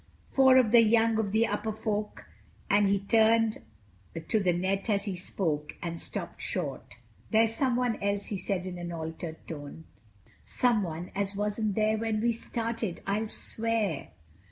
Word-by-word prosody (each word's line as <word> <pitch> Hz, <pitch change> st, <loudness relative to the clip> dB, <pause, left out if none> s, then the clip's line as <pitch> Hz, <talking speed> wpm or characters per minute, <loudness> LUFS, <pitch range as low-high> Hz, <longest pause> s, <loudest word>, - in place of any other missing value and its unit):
"Four 265 Hz, -1 st, +6 dB
of 245 Hz, -5 st, +4 dB
the 235 Hz, -1 st, +8 dB
young 225 Hz, 0 st, +3 dB
of 205 Hz, -3 st, -1 dB
the 220 Hz, +2 st, +3 dB
Upper 220 Hz, -1 st, -2 dB
Folk—" 210 Hz, -1 st, -3 dB, 0.5 s
and 205 Hz, 0 st, +5 dB
he 200 Hz, +1 st, +3 dB
turned 225 Hz, +1 st, +3 dB, 0.7 s
to 220 Hz, -, +3 dB
the 185 Hz, -3 st, +2 dB
net 190 Hz, +4 st, -1 dB
as 200 Hz, -1 st, +1 dB
he 195 Hz, -3 st, -2 dB
spoke, 155 Hz, -5 st, -3 dB
and 170 Hz, -1 st, -5 dB
stopped -, -, -5 dB
short—"there's 225 Hz, 0 st, -2 dB
someone 245 Hz, -2 st, +1 dB
else," 200 Hz, 0 st, 0 dB
he 205 Hz, -, -2 dB
said 185 Hz, -1 st, -2 dB
in 180 Hz, -1 st, -6 dB
an 175 Hz, 0 st, -5 dB
altered 160 Hz, 0 st, -5 dB
voice, 145 Hz, -3 st, -7 dB, 0.7 s
"someone 180 Hz, -, 0 dB
as 200 Hz, 0 st, -2 dB
wasn't 210 Hz, 0 st, -1 dB
there 215 Hz, 0 st, +2 dB
when 220 Hz, -1 st, -1 dB
we 235 Hz, +2 st, +2 dB
started, 230 Hz, -4 st, -3 dB
I'll 210 Hz, +3 st, 0 dB
swear." 220 Hz, -8 st, -1 dB
210 Hz, 155 wpm, -29 LUFS, 185-225 Hz, 0.7 s, the